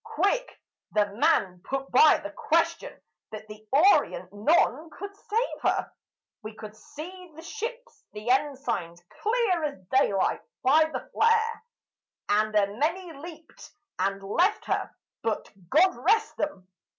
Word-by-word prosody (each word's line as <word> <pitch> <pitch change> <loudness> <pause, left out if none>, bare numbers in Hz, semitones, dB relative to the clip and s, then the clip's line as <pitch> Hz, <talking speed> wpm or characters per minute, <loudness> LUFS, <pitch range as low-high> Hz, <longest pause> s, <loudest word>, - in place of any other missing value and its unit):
Quick - - -1 0.3
the 210 -1 +4
man 185 -4 +2
put 270 0 -4
by 305 +5 +7
the 305 - -7
question. 325 +2 0 0.3
"But 215 0 -8
the 215 0 -12
Orient, 375 - +3
none 300 +6 +2
could 400 +6 -9
save 450 +4 -2
her; - - 0 0.5
We 215 0 -8
could 215 -1 -10
see 320 +8 -10
the 325 - -11
ships, 470 +6 -7
the 210 +3 -6
ensigns, 260 - -1 0.2
clear 430 -7 +1
as 285 -8 -4
daylight 205 -8 +2 0.2
by 300 +5 +5
the 315 - -6
flare; 455 0 +2 0.7
And 215 +1 +2
a 200 -1 +2
many 335 +5 -1
leaped 320 +2 -12 0.3
and 195 +1 -1
left 350 - +1
her; - - -1 0.3
but, 225 -2 -2 0.2
God 360 +6 +4
rest 440 +4 +1
'em! 195 -12 -3
300 Hz, 135 wpm, -27 LUFS, -, 0.7 s, by